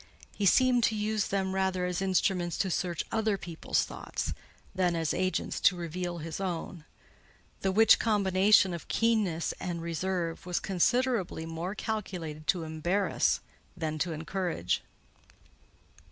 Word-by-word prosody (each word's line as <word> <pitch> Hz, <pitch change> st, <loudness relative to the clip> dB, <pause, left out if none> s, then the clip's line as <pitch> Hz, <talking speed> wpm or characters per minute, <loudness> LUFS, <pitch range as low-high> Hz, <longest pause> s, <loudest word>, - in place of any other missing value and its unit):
He 200 Hz, -, +1 dB
seemed 250 Hz, +2 st, +4 dB
to 220 Hz, -, +1 dB
use 215 Hz, -1 st, 0 dB
them 190 Hz, -1 st, -1 dB
rather 190 Hz, -1 st, 0 dB
as 180 Hz, 0 st, -2 dB
instruments 185 Hz, -2 st, +1 dB
to 190 Hz, -, 0 dB
search 175 Hz, -1 st, -1 dB
other 220 Hz, -2 st, +1 dB
people's 170 Hz, -3 st, -1 dB
thoughts, -, -, -4 dB, 0.4 s
than 180 Hz, -2 st, +1 dB
as 165 Hz, -2 st, 0 dB
agents 185 Hz, +1 st, -1 dB
to 190 Hz, -, +4 dB
reveal 175 Hz, +1 st, -4 dB
his 165 Hz, +1 st, -5 dB
own: 175 Hz, -3 st, -4 dB, 0.7 s
the 190 Hz, -, 0 dB
which 220 Hz, +3 st, +6 dB
combination 195 Hz, -2 st, +4 dB
of 170 Hz, -, -7 dB
keenness 215 Hz, -8 st, +1 dB
and 175 Hz, -2 st, -3 dB
reserve 170 Hz, 0 st, -2 dB
was 180 Hz, -1 st, -1 dB
considerably 195 Hz, -2 st, +1 dB
more 165 Hz, +4 st, -4 dB
calculated 175 Hz, -9 st, -4 dB
to 175 Hz, -3 st, +2 dB
embarrass 165 Hz, +5 st, 0 dB, 0.4 s
than 155 Hz, -2 st, -3 dB
to 170 Hz, +3 st, 0 dB
encourage. 165 Hz, -, -2 dB
185 Hz, 135 wpm, -30 LUFS, 170-200 Hz, 0.7 s, which